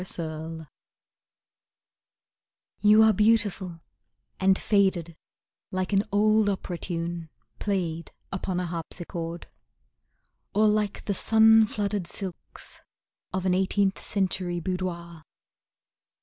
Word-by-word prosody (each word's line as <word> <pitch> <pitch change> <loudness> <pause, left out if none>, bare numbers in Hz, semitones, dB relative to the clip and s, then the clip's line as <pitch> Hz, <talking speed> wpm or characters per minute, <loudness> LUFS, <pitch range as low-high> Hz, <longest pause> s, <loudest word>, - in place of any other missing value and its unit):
A - - -3 0.4
Lady 160 0 -7 2.1
You 210 +2 +6
are 220 0 +5
beautiful 205 -5 +1 0.6
and 190 0 +4
faded 190 -5 +1 0.5
Like 185 +1 -2
an 200 +2 +3
old 215 +1 +3
opera 185 -3 -3
tune 170 -1 -4 0.3
Played 170 -5 -2 0.2
upon 185 -1 -2
a 180 - -2
harpsichord; 170 0 -5 1.1
Or 215 +1 +5
like 210 -1 0
the 200 - 0
sun 220 +2 +5
flooded 205 -3 -2
silks 185 -1 -7 0.5
Of 190 0 -3
an 185 - +3
eighteenth 190 +1 +1
century 185 -3 -1
boudoir. 170 -2 -4
190 Hz, 100 wpm, -26 LUFS, 170-205 Hz, 2.1 s, You